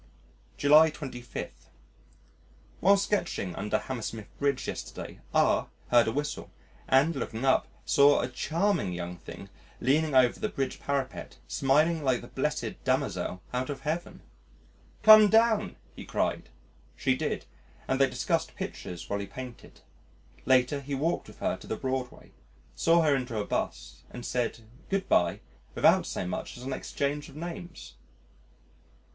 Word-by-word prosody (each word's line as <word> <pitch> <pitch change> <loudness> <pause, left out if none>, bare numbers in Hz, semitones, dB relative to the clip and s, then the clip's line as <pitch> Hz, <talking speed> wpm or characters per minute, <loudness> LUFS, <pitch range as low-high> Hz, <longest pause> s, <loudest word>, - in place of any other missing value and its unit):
July 150 +2 +7
25. 135 -5 -7 1.3
While 200 +3 +5
sketching 175 - -1
under 105 +2 0
Hammersmith 115 -4 -6
Bridge 140 -2 0
yesterday, - - -6
R - - +2 0.2
heard 120 -1 +5
a - - +1
whistle, 145 +4 -3 0.4
and, 140 +5 +4
looking 120 -1 -3
up, 130 - +3 0.2
saw 145 0 +5
a 125 - -1
charming 160 - 0
"young 90 0 -5
thing" 80 - -10 0.3
leaning 145 +3 +2
over 125 -2 +4
the - - -1
Bridge 135 -1 -3
parapet 140 -2 -3
smiling 155 +4 +2
like 130 -3 +1
the - - -10
blessed - - -3
Damozel 90 - -1
out 125 +2 -1
of 145 - -5
Heaven. 160 +3 -4 0.8
"Come 215 -1 +9
down," 220 -2 +3 0.2
he - - -8
cried. - - -2 0.5
She 130 +1 +1
did, - - -3 0.4
and 135 +1 +1
they 135 - +5
discussed 125 +7 -1
pictures 85 -2 -6
while 100 - -2
he 100 - -5
painted. 125 +1 -10 0.7
Later 130 +2 +3
he 140 +1 -4
walked 160 +6 -1
with - - -13
her - - -1
to - - -13
the - - -2
Broadway, 130 -1 -4 0.4
saw 165 - +3
her 150 -3 +4
into 125 -4 -3
a 105 - -1
'bus - - -4
and 125 - -8
said 120 -2 -2 0.3
"Good 195 0 -1
bye," 85 -1 +2 0.3
without - - +4
so - - -3
much 90 - -5
as 125 - -10
an 135 +1 -3
exchange 145 +2 -3
of - - -15
names. 175 +2 -8
135 Hz, 145 wpm, -28 LUFS, 125-160 Hz, 1.3 s, Come